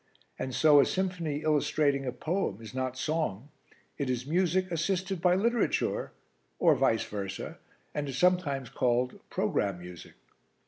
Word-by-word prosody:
And 130 Hz, -1 st, -3 dB
so 150 Hz, -2 st, +6 dB
a -, -, +6 dB
symphony 170 Hz, -6 st, -2 dB
illustrating 145 Hz, -2 st, +1 dB
a -, -, 0 dB
poem 160 Hz, -, -2 dB
is 115 Hz, +1 st, -10 dB
not 130 Hz, 0 st, -2 dB
song 150 Hz, -5 st, -2 dB, 0.5 s
it 140 Hz, -2 st, -1 dB
is 125 Hz, 0 st, -1 dB
music 185 Hz, +3 st, +1 dB
assisted 185 Hz, +2 st, -1 dB
by 180 Hz, 0 st, +4 dB
literature, 230 Hz, +4 st, 0 dB, 0.5 s
or -, -, +5 dB
vice 110 Hz, -1 st, +2 dB
versa, 100 Hz, -2 st, -5 dB, 0.3 s
and 145 Hz, -1 st, -2 dB
is 135 Hz, -, -4 dB
sometimes 150 Hz, -8 st, +2 dB
called 125 Hz, 0 st, 0 dB
Programme 100 Hz, -3 st, 0 dB
Music. 90 Hz, -1 st, -10 dB
145 Hz, 140 wpm, -29 LUFS, 125-180 Hz, 0.5 s, so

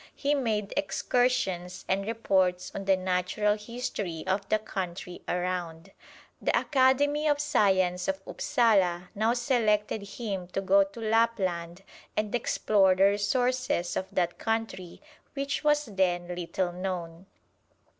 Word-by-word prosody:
He 285 Hz, 0 st, 0 dB
made 220 Hz, -7 st, -1 dB
excursions 195 Hz, -6 st, 0 dB
and 195 Hz, +1 st, 0 dB
reports 190 Hz, -5 st, +1 dB
on 195 Hz, -, -5 dB
the 195 Hz, -1 st, +4 dB
Natural 185 Hz, +3 st, 0 dB
History 210 Hz, -6 st, -5 dB
of 195 Hz, +1 st, -1 dB
the 215 Hz, -, +4 dB
country 185 Hz, -4 st, -6 dB
around. 175 Hz, -2 st, -3 dB, 0.5 s
The -, -, +2 dB
Academy 285 Hz, +2 st, +2 dB
of 290 Hz, -1 st, +2 dB
Science 190 Hz, -10 st, +2 dB
of 190 Hz, 0 st, -1 dB
Upsala 200 Hz, -10 st, +1 dB
now 220 Hz, +3 st, +1 dB
selected 220 Hz, -4 st, +1 dB, 0.2 s
him 195 Hz, -6 st, -4 dB
to 195 Hz, -, 0 dB
go 195 Hz, +1 st, +5 dB
to 195 Hz, +4 st, -10 dB
Lapland 195 Hz, -6 st, 0 dB, 0.3 s
and 215 Hz, -1 st, -1 dB
explore 200 Hz, -5 st, +3 dB
the 190 Hz, -, +3 dB
resources 205 Hz, -1 st, +1 dB
of 190 Hz, -, -2 dB
that 175 Hz, -1 st, -1 dB
country, 225 Hz, -, -3 dB, 0.3 s
which 280 Hz, +1 st, -2 dB
was 295 Hz, 0 st, +3 dB
then 180 Hz, -4 st, 0 dB
little 175 Hz, +1 st, -2 dB
known. 180 Hz, -1 st, -5 dB
195 Hz, 125 wpm, -28 LUFS, 180-230 Hz, 0.5 s, go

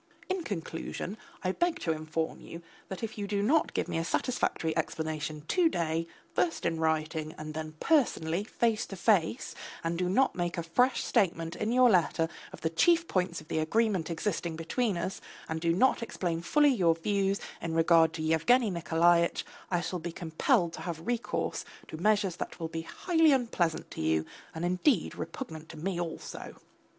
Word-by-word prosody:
In 375 Hz, -1 st, 0 dB
conclusion, 180 Hz, -, -4 dB, 0.3 s
I 185 Hz, -, +1 dB
beg 345 Hz, -, 0 dB
to 165 Hz, -, 0 dB
inform 160 Hz, +1 st, -3 dB
you 165 Hz, +1 st, -9 dB, 0.2 s
that 190 Hz, +3 st, -7 dB
if 220 Hz, -1 st, -4 dB
you 200 Hz, -, -2 dB
do 200 Hz, 0 st, 0 dB
not 300 Hz, +9 st, +2 dB
give -, -, 0 dB
me -, -, -1 dB
a -, -, -1 dB
satisfactory 165 Hz, -5 st, 0 dB
explanation 155 Hz, -1 st, -2 dB
to 350 Hz, -3 st, +4 dB
day, 165 Hz, -, -1 dB, 0.3 s
first 175 Hz, -2 st, 0 dB
in 165 Hz, -1 st, 0 dB
writing, 160 Hz, 0 st, -1 dB
and 155 Hz, 0 st, -6 dB
then 155 Hz, 0 st, -5 dB
personally 200 Hz, -, +2 dB
face 230 Hz, +1 st, 0 dB
to 195 Hz, -, -7 dB
face, 195 Hz, +3 st, +1 dB, 0.3 s
and 165 Hz, +1 st, -1 dB
do 180 Hz, -1 st, +1 dB
not 260 Hz, +8 st, +3 dB
make 175 Hz, 0 st, -2 dB
a 170 Hz, -, -1 dB
fresh 245 Hz, +11 st, +2 dB
statement 165 Hz, -3 st, +1 dB
in 215 Hz, +2 st, -1 dB
your 250 Hz, +1 st, +6 dB
letter 175 Hz, -5 st, +3 dB, 0.2 s
of -, -, -11 dB
the 160 Hz, -, +1 dB
chief 335 Hz, -, +4 dB
points 180 Hz, -3 st, -1 dB
of 155 Hz, -, -16 dB
the 160 Hz, -, -1 dB
agreement 190 Hz, 0 st, +1 dB
existing 170 Hz, -1 st, -2 dB
between 190 Hz, +5 st, -1 dB
us, 185 Hz, +3 st, -3 dB, 0.3 s
and 160 Hz, 0 st, -3 dB
do 165 Hz, 0 st, +2 dB
not 245 Hz, +9 st, +3 dB
explain 175 Hz, -7 st, -2 dB
fully 290 Hz, -, +4 dB
your 170 Hz, -8 st, +3 dB
views 195 Hz, +3 st, 0 dB, 0.2 s
in 165 Hz, -1 st, -3 dB
regard 165 Hz, 0 st, +5 dB
to 160 Hz, -1 st, -4 dB
Yevgeny 200 Hz, +9 st, +3 dB
Nikolaitch, 170 Hz, +1 st, +2 dB, 0.2 s
I 175 Hz, -2 st, +1 dB
shall 180 Hz, 0 st, -3 dB
be 170 Hz, +1 st, -5 dB
compelled 170 Hz, -, +1 dB
to -, -, -7 dB
have 165 Hz, -2 st, -5 dB
recourse 240 Hz, -1 st, -1 dB, 0.3 s
to 155 Hz, -, -6 dB
measures 200 Hz, -1 st, +2 dB
that -, -, -6 dB
will 165 Hz, -1 st, -3 dB
be 165 Hz, 0 st, -4 dB
highly 325 Hz, -, +2 dB
unpleasant 230 Hz, -, 0 dB
to -, -, -5 dB
you, 80 Hz, 0 st, +1 dB, 0.3 s
and 165 Hz, +2 st, -2 dB
indeed 180 Hz, -, +2 dB
repugnant 160 Hz, -, -7 dB
to 160 Hz, -, -9 dB
me 175 Hz, +3 st, -2 dB
also. 165 Hz, -2 st, -6 dB
170 Hz, 180 wpm, -30 LUFS, 160-215 Hz, 0.3 s, your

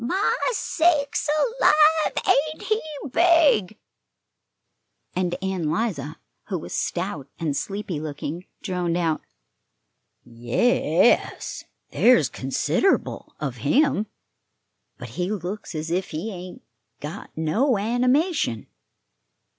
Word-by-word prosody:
My 370 Hz, +12 st, +1 dB, 0.2 s
sakes 315 Hz, -8 st, +1 dB, 0.3 s
alive, 310 Hz, +1 st, +5 dB
ain't 310 Hz, -3 st, +2 dB
he 435 Hz, 0 st, 0 dB, 0.3 s
big!" 320 Hz, -, +4 dB, 1.4 s
And 180 Hz, -1 st, 0 dB
Ann 185 Hz, -5 st, -1 dB
'Liza, 155 Hz, -5 st, -2 dB, 0.3 s
who -, -, -2 dB
was -, -, -7 dB
stout 130 Hz, -, -2 dB
and 155 Hz, -4 st, -2 dB
sleepy 195 Hz, -4 st, -3 dB
looking, 155 Hz, +3 st, -5 dB, 0.2 s
droned 180 Hz, -3 st, -1 dB
out: 165 Hz, -3 st, 0 dB, 1.0 s
"Ye 115 Hz, +1 st, -6 dB, 0.5 s
es, -, -, -3 dB, 0.3 s
there's 170 Hz, -, +4 dB
consider'ble 150 Hz, -, 0 dB
of -, -, -4 dB
him; 275 Hz, -8 st, +2 dB, 0.9 s
but -, -, -8 dB
he 180 Hz, +1 st, -3 dB
looks 195 Hz, -2 st, -5 dB
as 155 Hz, +1 st, -4 dB
if 185 Hz, +2 st, -1 dB
he 165 Hz, +9 st, -4 dB
ain't 180 Hz, -1 st, -9 dB, 0.4 s
got 150 Hz, +2 st, -7 dB
no 215 Hz, -, +2 dB
animation." 250 Hz, -, +1 dB
190 Hz, 100 wpm, -24 LUFS, -, 1.4 s, alive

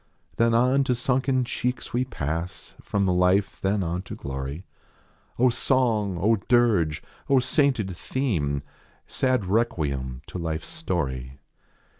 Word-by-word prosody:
Then 115 Hz, 0 st, +3 dB
on 130 Hz, +4 st, +4 dB
to 125 Hz, -, +1 dB
sunken 130 Hz, +1 st, +1 dB
cheeks 125 Hz, +1 st, -3 dB
we 125 Hz, +2 st, +1 dB
pass. 85 Hz, -, -4 dB
From 100 Hz, -1 st, 0 dB
life 90 Hz, +2 st, +2 dB
then 100 Hz, 0 st, +1 dB
on 85 Hz, +1 st, -2 dB
to 95 Hz, -, -8 dB
glory. 70 Hz, +5 st, -5 dB, 0.7 s
O 125 Hz, +1 st, +4 dB
song! 115 Hz, -7 st, +1 dB
O 110 Hz, +5 st, +3 dB
dirge 110 Hz, -, +3 dB, 0.3 s
I -, -, +3 dB
O 135 Hz, -, +7 dB
sainted 125 Hz, -, +1 dB
theme! 80 Hz, -, -1 dB, 0.4 s
Sad 130 Hz, -6 st, 0 dB
requiem 70 Hz, -, -1 dB
to 90 Hz, -, -7 dB
life 80 Hz, -2 st, -3 dB
s -, -, -10 dB
story. 70 Hz, -, -3 dB
100 Hz, 135 wpm, -25 LUFS, 80-125 Hz, 0.7 s, O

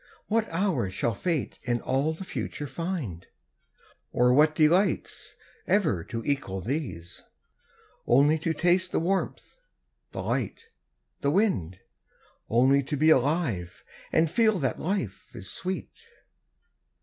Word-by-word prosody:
What 225 Hz, +1 st, 0 dB
hour 165 Hz, -, 0 dB
shall 115 Hz, +5 st, -1 dB
Fate 160 Hz, -, -2 dB
in 120 Hz, -2 st, -1 dB
all 135 Hz, +6 st, 0 dB
the 160 Hz, +4 st, -6 dB
future 150 Hz, -5 st, -5 dB
find, 145 Hz, -, -4 dB, 0.8 s
Or 125 Hz, 0 st, +4 dB
what 150 Hz, +3 st, +5 dB
delights, 175 Hz, +6 st, +2 dB, 0.3 s
ever 155 Hz, -, +2 dB
to 115 Hz, -1 st, -5 dB
equal 135 Hz, -10 st, -1 dB
these: 95 Hz, -, -4 dB, 0.9 s
Only 145 Hz, +6 st, +5 dB
to 165 Hz, +1 st, -1 dB
taste 180 Hz, +3 st, +2 dB
the -, -, +2 dB
warmth, 190 Hz, -, -2 dB, 0.5 s
the -, -, -5 dB
light, 455 Hz, -, -3 dB, 0.5 s
the 140 Hz, -, +1 dB
wind, 110 Hz, -, +1 dB, 0.7 s
Only 130 Hz, +4 st, +4 dB
to 145 Hz, +2 st, -3 dB
be 155 Hz, +3 st, +5 dB
alive, 130 Hz, -, +1 dB, 0.3 s
and 160 Hz, +1 st, +3 dB
feel 215 Hz, +2 st, +3 dB
that 135 Hz, -6 st, -1 dB
life 165 Hz, -, -3 dB
is 95 Hz, -4 st, -6 dB
sweet? 185 Hz, +1 st, -4 dB
150 Hz, 125 wpm, -27 LUFS, 120-175 Hz, 0.9 s, what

